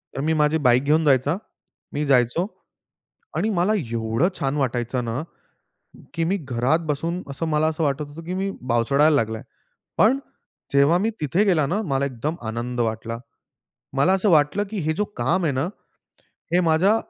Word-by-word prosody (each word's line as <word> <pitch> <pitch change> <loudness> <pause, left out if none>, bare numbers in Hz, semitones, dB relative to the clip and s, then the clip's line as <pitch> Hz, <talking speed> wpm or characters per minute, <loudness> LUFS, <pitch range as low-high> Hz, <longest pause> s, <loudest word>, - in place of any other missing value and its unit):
तर 135 - -2
मी 160 +2 +1
माझी 150 +2 +3
बाईक 125 +2 +4
घेऊन 155 +3 +2
जायचा. 140 +3 +3 0.6
मी 150 +1 -1
जायचो 135 +6 +2 0.9
आणि 220 - +1
मला 195 +2 +2 0.2
एवढं 115 +8 +1
छान 140 +1 0
वाटायचं 125 -2 -1
ना, 115 +5 -2 0.9
की 165 - -1
मी 195 - +1
घरात 130 0 0
बसून 165 +5 -2
असं 165 +4 -3
मला 155 0 +2
असं 160 +1 -1
वाटत 140 0 0
होतं 165 +3 -10
की 180 - -4
मी 195 +1 -1
बावचळायला 135 +5 +3
लागला. 110 -4 0 0.6
पण 245 +6 +4 0.5
जेव्हा 140 +5 +5
मी 225 - +2
तिथे 160 +7 +2
गेला 170 -7 +3
ना, 205 +6 0
मला 140 -7 0
एकदम 140 +5 -3
आनंद 120 +2 -4
वाटला. 115 0 -2 0.8
मला 140 +7 +4
असं 195 +2 +2
वाटलं 155 +5 +3
की 215 - -4
हे 160 - +2
जो 210 - +1
काम 185 +1 +1
आहे 150 - +1
ना, 135 +5 0 0.9
हे 180 - +5
माझ्या 175 +6 +3
150 Hz, 170 wpm, -23 LUFS, 130-170 Hz, 0.9 s, जेव्हा